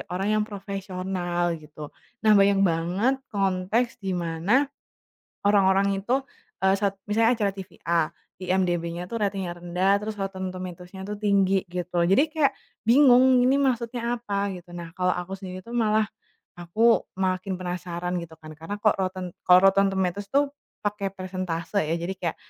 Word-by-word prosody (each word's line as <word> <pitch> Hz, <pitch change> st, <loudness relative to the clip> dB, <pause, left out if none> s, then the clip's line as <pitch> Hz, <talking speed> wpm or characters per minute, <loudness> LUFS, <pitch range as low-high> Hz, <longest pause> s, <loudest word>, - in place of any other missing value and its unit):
orang 190 Hz, +3 st, -2 dB
yang 210 Hz, -, +1 dB
profesional, 185 Hz, -3 st, -3 dB
gitu. 150 Hz, -1 st, -10 dB, 0.3 s
Nah, 215 Hz, -, +6 dB
banyak 200 Hz, -1 st, +5 dB
banget 180 Hz, +8 st, +1 dB
konteks 195 Hz, +4 st, 0 dB
di 190 Hz, -3 st, -2 dB
mana 175 Hz, -, +1 dB, 0.8 s
orang-orang 195 Hz, -1 st, +3 dB
itu, 255 Hz, +7 st, 0 dB, 0.4 s
eee, 190 Hz, 0 st, +3 dB
sat 200 Hz, -1 st, 0 dB
misalnya 225 Hz, +3 st, +3 dB
acara 205 Hz, -3 st, 0 dB
TV 190 Hz, -1 st, -10 dB
A, 165 Hz, -2 st, +2 dB, 0.3 s
IMDb-nya 180 Hz, -1 st, -1 dB
tuh 230 Hz, -, -2 dB
ratingnya 190 Hz, -4 st, -2 dB
rendah, 185 Hz, +3 st, +1 dB
terus 215 Hz, +1 st, -5 dB
Rotten 195 Hz, -1 st, -4 dB
Tomatoes-nya 185 Hz, +1 st, -8 dB
tuh 205 Hz, +1 st, -6 dB
tinggi, 195 Hz, -2 st, +2 dB
gitu. 180 Hz, 0 st, -3 dB
Jadi 280 Hz, -, +3 dB
kayak 305 Hz, -4 st, +2 dB, 0.3 s
bingung, 255 Hz, -1 st, +6 dB
ini 270 Hz, +2 st, +3 dB
maksudnya 240 Hz, -2 st, 0 dB
apa, 200 Hz, -4 st, -2 dB
gitu. 175 Hz, 0 st, -12 dB
Nah, 170 Hz, -1 st, -8 dB
kalau 180 Hz, -1 st, +1 dB
aku 180 Hz, +2 st, -4 dB
sendiri 185 Hz, -1 st, -7 dB
tuh 235 Hz, -, -7 dB
malah, 215 Hz, -2 st, +2 dB, 0.5 s
aku 215 Hz, +7 st, +3 dB, 0.2 s
makin 185 Hz, 0 st, 0 dB
penasaran, 180 Hz, 0 st, -3 dB
gitu 165 Hz, -1 st, -8 dB
kan. 155 Hz, 0 st, -10 dB
Karena 165 Hz, +6 st, -5 dB
kok 215 Hz, -, +4 dB
Rotten 185 Hz, -1 st, -3 dB, 0.2 s
kalau 180 Hz, 0 st, +8 dB
Rotten 195 Hz, +1 st, +3 dB
Tomatoes 190 Hz, +1 st, -1 dB
tuh 280 Hz, 0 st, +2 dB, 0.3 s
pakai 205 Hz, -1 st, -1 dB
persentase, 185 Hz, -1 st, -3 dB
ya. 160 Hz, +2 st, -1 dB
Jadi 175 Hz, +3 st, -3 dB
kayak, 175 Hz, -3 st, -3 dB
190 Hz, 155 wpm, -25 LUFS, 180-210 Hz, 0.8 s, kalau